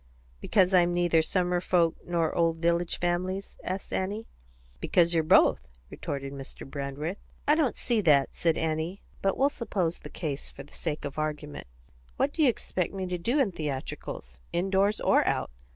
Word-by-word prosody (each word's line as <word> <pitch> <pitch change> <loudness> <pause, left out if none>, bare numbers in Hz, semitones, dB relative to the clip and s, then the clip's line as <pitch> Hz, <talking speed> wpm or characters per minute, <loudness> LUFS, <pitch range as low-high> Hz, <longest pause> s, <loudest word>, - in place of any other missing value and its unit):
"Because 190 - +3
I'm 175 -1 +4
neither 175 -2 +4
summer 180 +1 +1
folks 170 -3 +2
nor 170 -2 +1
old 165 -1 +2
village 170 +1 +1
families?" 185 +3 -1
asked 185 +1 -4
Annie. 205 +4 -2 0.5
"Because 170 - +3
you're 165 - +4
both," 155 - +5 0.2
retorted 140 -1 -5
Mr. 135 -1 -8
Brandreth. 140 +6 -4 0.3
"I 295 - +6
don't 310 -5 +2
see 235 -3 0
that," 145 -7 +4
said 165 -2 +1
Annie; 160 +4 -2 0.2
"but 195 -1 +1
we'll 275 +1 +4
suppose 185 -10 -2
the - - -10
case, 150 -4 -4
for - - -10
the - - -19
sake 155 -3 -3
of 145 +1 -5
argument. 150 - -4 0.5
What 285 - +1
do 325 - -1
you 285 - +6
expect 190 -5 -2
me 190 -1 -2
to 180 -1 -3
do 240 - +1
in 245 -8 +3
theatricals, 135 - -5
in 180 +3 -1
doors 200 +2 +3
or - - +4
out? - - 0
175 Hz, 175 wpm, -28 LUFS, 155-190 Hz, 0.5 s, I